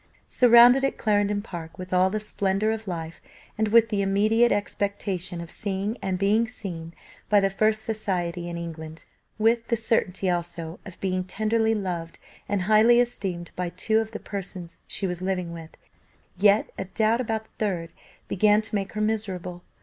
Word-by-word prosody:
Surrounded 245 +2 +7
at 275 - 0
Clarendon 205 -1 +1
Park 170 -5 -8
with 185 0 -7
all 185 +1 +4
the 215 +2 -2
splendour 205 0 0
of 220 -1 -5
life, 165 -2 -5 0.3
and 220 0 0
with 225 +1 +5
the 205 -2 0
immediate 215 +4 +3
expectation 200 -3 -2
of 170 -1 -8
seeing 200 +2 -2
and 190 -1 -1
being 210 +4 +2
seen 170 -7 -7 0.3
by 205 0 +6
the 195 0 +1
first 215 +2 +1
society 180 -6 -2
in 170 - -5
England; 160 -1 -7 0.3
with 230 +1 +2
the 235 - +1
certainty 205 -4 0
also 170 -1 -3
of 185 - -11
being 185 -1 0
tenderly 220 +3 +1
loved 175 -5 -4 0.3
and 200 -3 0
highly 220 +4 +5
esteemed 190 -8 -2
by 180 -1 -2
two 220 +5 +1
of 220 0 -3
the 215 - -6
persons 180 -4 -7
she 195 - -2
was 180 -1 -3
living 185 -2 -2
with, 165 -1 -10 0.6
yet 200 +3 +3
a 190 - -2
doubt 220 +5 +1
about 220 -2 -2
the - - -30
third 175 -6 -2 0.3
began 210 +2 +4
to 220 0 -7
make 200 -2 -2
her 215 - -2
miserable. 190 -5 -2
200 Hz, 170 wpm, -25 LUFS, 180-220 Hz, 0.6 s, Surrounded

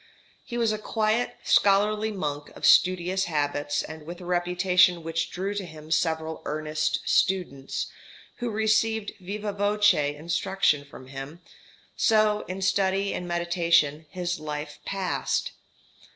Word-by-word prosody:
He 240 -2 -6
was 230 -2 +2
a 215 - -2
quiet, 220 +2 0
scholarly 210 +2 +3
monk 150 -7 -4
of - - -4
studious 185 +1 +4
habits, 145 -2 -1
and 160 0 -8
with 170 +4 -8
a 180 - -10
reputation 180 0 +3
which 165 +1 -2
drew 195 +3 -3
to 205 -1 -3
him 155 -2 -11
several 160 0 0
earnest 155 0 -1
students, 175 -8 0 0.5
who 240 -1 -3
received 220 0 +1
vivâ 205 +2 -4
voce 205 -8 +2
instruction 170 -2 +1
from 130 -2 -13
him; 135 +5 -8 0.6
so, 215 -2 +3
in 190 +1 -4
study 195 0 +1
and 180 - -4
meditation, 170 -3 +1
his 175 -2 -3
life 150 0 -6
passed. 195 -2 -1
180 Hz, 130 wpm, -26 LUFS, 155-205 Hz, 0.6 s, studious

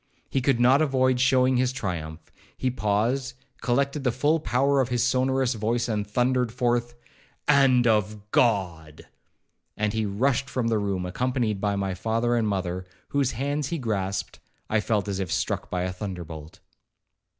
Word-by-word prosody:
He 135 - +1
could 125 -1 +2
not 130 +4 +5
avoid 130 -4 +2
showing 130 0 +3
his 125 0 +2
triumph. 85 -9 -5 0.3
He 130 - 0
paused, 125 +4 0 0.3
collected 140 +3 0
the 125 - +2
full 145 +7 +1
power 135 +3 +2
of 130 - -1
his 125 -1 +1
sonorous 130 0 +1
voice, 115 +2 -1
and 105 -3 -2
thundered 125 +1 +1
forth, 120 0 0 0.5
'And 135 -4 +5
of 105 -2 0
God!' 85 -10 0 0.7
And 105 -1 0
as 110 - -1
he 110 - 0
rushed 130 +6 0
from 120 -3 -1
the 110 -2 +1
room, 100 -3 -2
accompanied 115 +1 -1
by 100 -1 0
my 100 -1 -1
father 115 +5 0
and 115 -2 +1
mother, 90 -2 -2 0.2
whose 140 -3 +1
hands 140 +3 -2
he 170 - -2
grasped, 100 -7 -3 0.3
I 105 - +3
felt 105 -2 0
as 100 -1 -2
if 95 -4 -3
struck - - -1
by 90 -1 -1
a 90 0 -2
thunderbolt. 90 -3 -7
115 Hz, 165 wpm, -25 LUFS, 100-130 Hz, 0.7 s, not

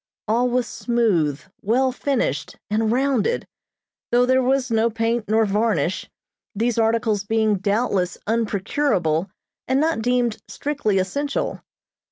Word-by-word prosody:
All 240 +3 +2
was 250 0 +1
smooth, 190 - 0 0.2
well 255 +5 +2
finished, 255 - -2
and 220 +1 +1
rounded, 270 - +1 0.7
though 245 +1 +4
there 260 +1 +3
was 255 -1 +1
no 225 +1 +3
paint 230 0 -1
nor 220 +1 +3
varnish, 200 -4 0 0.5
these 230 +2 0
articles 225 -2 +1
being 220 0 +1
doubtless 200 -2 0
unprocurable 200 - 0 0.4
and 260 +1 +2
not 315 -5 +1
deemed 245 -1 +1
strictly 280 -9 -1
essential. 280 +10 -2
225 Hz, 120 wpm, -22 LUFS, 205-250 Hz, 0.7 s, though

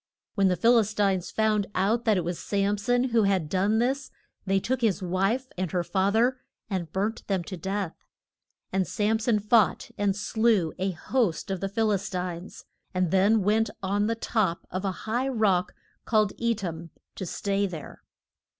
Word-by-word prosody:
When 200 -2 +3
the 180 - +2
Phil 235 +4 +5
is 215 -1 -1
tines 195 -3 +1
found 215 -2 +1
out 220 +6 +1
that 215 -3 +4
it 180 - 0
was 175 +1 -3
Sam 200 0 0
son 245 +4 +1
who 230 -1 +3
had 190 -5 +1
done 195 +6 +1
this 260 +3 0 0.4
they 195 0 +3
took 255 +5 -2
his 210 -4 +1
wife 195 +8 0
and 185 -2 -1
her 180 -1 +1
fath 195 +3 0
er 245 +3 +3 0.3
and 175 -5 -2
burnt 205 +4 -2
them 190 -3 0
to 185 - -6
death. 190 0 -3 0.8
And 190 -1 +1
Sam 220 +1 +1
son 225 -1 +2
fought 210 0 +2
and 200 -1 +2
slew 215 -5 +1
a 190 +1 0
host 195 +1 -1
of 190 - -2
the 195 - -2
Phil 220 +2 +1
is 200 -1 -1
tines, 180 -1 -5 0.3
and 185 -2 +1
then 200 +3 +4
went 220 +3 +2
on 205 +2 +1
the 230 - 0
top 215 -6 -1
of 185 +2 -3
a 195 - +1
high 240 +4 0
rock 210 -8 +1 0.3
called 215 -3 +2
E 235 0 +1
tam 170 -5 -6 0.2
to 190 - -6
stay 200 +3 -1
there. 165 -5 -9
200 Hz, 185 wpm, -27 LUFS, 185-220 Hz, 0.8 s, Phil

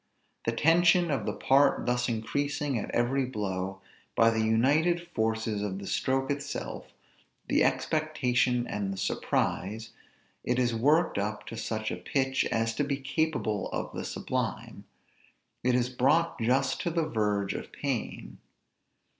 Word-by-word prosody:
The 115 - +2
tension 170 +4 +4
of 140 - -1
the - - 0
part 140 +1 +3
thus 125 0 +1
increasing 145 +4 -1
at - - -5
every 130 +3 +1
blow, 95 -6 -3 0.3
by 115 0 +5
the 110 -1 0
united 150 +10 +2
forces 110 -5 -1
of 100 -2 -3
the 100 - -7
stroke 135 +6 0
itself, 140 - -4 0.6
the - - +3
expectation 125 -6 +1
and 100 -4 -3
the 95 - -5
surprise, 105 +3 -1 0.5
it 125 - 0
is 120 -2 +2
worked 145 +3 +3
up 105 +1 -3
to - - -7
such 110 -1 -3
a 90 - -3
pitch 130 +8 0
as 115 0 0
to - - +2
be 140 -1 -1
capable 135 -6 -1
of - - -4
the - - -3
sublime; - - -4 0.8
it 125 0 +3
is 125 -1 +2
brought 140 +7 +2
just 130 +4 +1
to - - -1
the 165 -1 0
verge 105 -6 0
of - - -6
pain. 135 -5 -4
125 Hz, 145 wpm, -29 LUFS, 110-145 Hz, 0.8 s, by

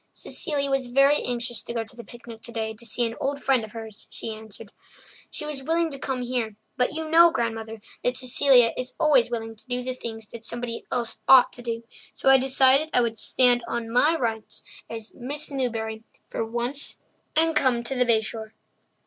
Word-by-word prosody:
"Cecilia 280 -4 -3
was 270 -2 0
very 275 +4 +4
anxious 240 -1 -2
to 235 - -7
go 230 - 0
to 220 - -11
the 235 - -9
picnic 235 -2 -12
today 225 -2 -4
to 230 +2 -9
see 240 +2 +1
an 230 - -3
old 280 +1 -1
friend 265 -4 +2
of 215 - -9
hers," 220 -2 -9
she 225 - -5
answered. 220 -1 -11 0.6
"She 300 - -5
was 300 -3 -4
willing 330 +3 0
to 275 - -6
come 260 -2 -2
here, 240 -4 -2 0.2
but 250 -1 +1
you 320 +1 -4
know, 335 +2 +7
Grandmother, 225 -5 -3 0.2
that 250 0 +1
Cecilia 255 -1 +5
is 255 0 -4
always 295 -7 +4
willing 225 -1 -4
to 215 - -18
do 250 0 -2
the 255 0 -3
things 225 -3 -7
somebody 235 0 -5
else 235 -2 -2
ought 260 -1 +7
to 245 - -9
do, 230 -1 -4 0.3
so - - +2
I 270 0 +8
decided 265 +3 +4
I 245 - +6
would 225 -2 -2
stand 245 -2 +4
on 230 -1 -3
my 300 +7 +4
rights 225 -5 -3 0.3
as 225 -1 -7
'Miss 290 +5 -5
Newbury' 225 -4 -2 0.3
for - - -2
once 240 +5 -2 0.4
and 325 0 +3
come 245 -3 +2
to 235 - -4
the 250 -1 +2
Bay 230 -3 +3
Shore." 220 0 -7
245 Hz, 200 wpm, -25 LUFS, 225-270 Hz, 0.6 s, I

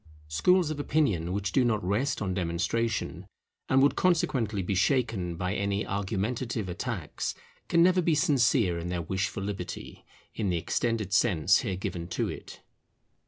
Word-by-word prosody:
Schools 170 - +3
of 150 - -4
opinion 110 - +1
which 100 0 -2
do 130 - +3
not 110 -3 +1
rest 110 +6 0
on 95 -2 -1
demonstration, 90 +6 -1 0.4
and 135 +1 +5
would 145 - +4
consequently 125 - +1
be 95 - -1
shaken 105 - +1
by 90 +2 -2
any 100 0 -1
argumentative 105 +3 -2
attacks, 90 - -4 0.3
can 170 0 +4
never 180 +1 +4
be 165 -2 +2
sincere 120 - +3
in 85 - -5
their 90 -1 -2
wish 95 +3 -1
for 95 - -6
Liberty, 95 -3 -6 0.3
in 105 -4 -1
the 90 - +1
extended 110 +3 -1
sense 95 -4 +4
here 100 -7 -2
given 85 -2 -4
to 90 - -1
it. - - -9
100 Hz, 160 wpm, -28 LUFS, 90-125 Hz, 0.4 s, and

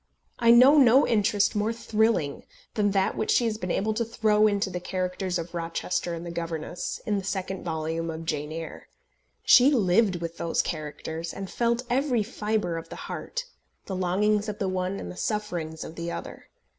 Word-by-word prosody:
I 235 - +3
know 255 +6 +8
no 260 +1 +6
interest 210 -2 +2
more 210 +2 +1
thrilling 220 -9 0 0.3
than 205 -2 +2
that 195 -1 +1
which 215 - -2
she 240 - +4
has 220 -1 -1
been 180 - -4
able 215 +5 0
to 230 +2 0
throw 215 -2 +3
into 200 -2 0
the 180 - -3
characters 185 0 -2
of 170 0 -6
Rochester 170 +1 -2
and 165 +1 -7
the 170 - -5
governess, 170 0 -4
in 205 -2 0
the - - -7
second 190 0 -3
volume 165 0 -2
of 165 0 -6
Jane 150 -2 -2
Eyre. 165 0 -7 0.6
She 255 +3 +7
lived 205 -5 +3
with 170 -1 -5
those 165 - 0
characters, 160 +1 -5
and 195 -1 -7
felt 235 +1 0
every 250 -2 +1
fibre 210 -5 -2
of 165 - -8
the - - -7
heart, 485 +1 -5 0.4
the 190 - -4
longings 205 +4 +1
of 210 - -5
the 200 -3 -1
one 185 +1 -2
and - - -6
the - - -10
sufferings 175 -8 -3
of 160 - -8
the 170 +1 -5
other. - - -8
195 Hz, 190 wpm, -26 LUFS, 170-220 Hz, 0.6 s, know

